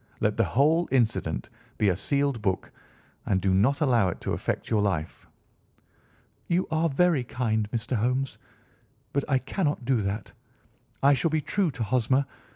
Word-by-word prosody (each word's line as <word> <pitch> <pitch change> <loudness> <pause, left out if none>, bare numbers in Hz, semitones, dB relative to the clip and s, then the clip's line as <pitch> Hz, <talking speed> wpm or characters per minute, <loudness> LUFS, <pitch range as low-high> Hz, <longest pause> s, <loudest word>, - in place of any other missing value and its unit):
Let - - +1
the - - +2
whole 155 +6 +2
incident 115 - 0 0.3
be 105 - +2
a 90 - +1
sealed 140 +3 0
book, 95 -3 -1 0.5
and 95 - +1
do 95 0 +1
not 125 - +2
allow 120 -9 +3
it - - -5
to - - -2
affect - - -3
your 110 -2 +3
life." 85 -6 -2 1.2
"You 175 +2 +1
are 160 +1 +2
very 155 -1 +2
kind, 110 -4 -1
Mr. 115 +2 -2
Holmes, 125 +5 -1 0.7
but 140 - +1
I 135 - +4
cannot 145 0 -2
do 130 0 +2
that. 100 +2 -3 0.7
I 140 +1 +6
shall 165 +5 +1
be 155 0 +1
true 190 +3 0
to 135 -5 -4
Hosmer. 130 +4 +2
125 Hz, 160 wpm, -27 LUFS, 110-145 Hz, 1.2 s, I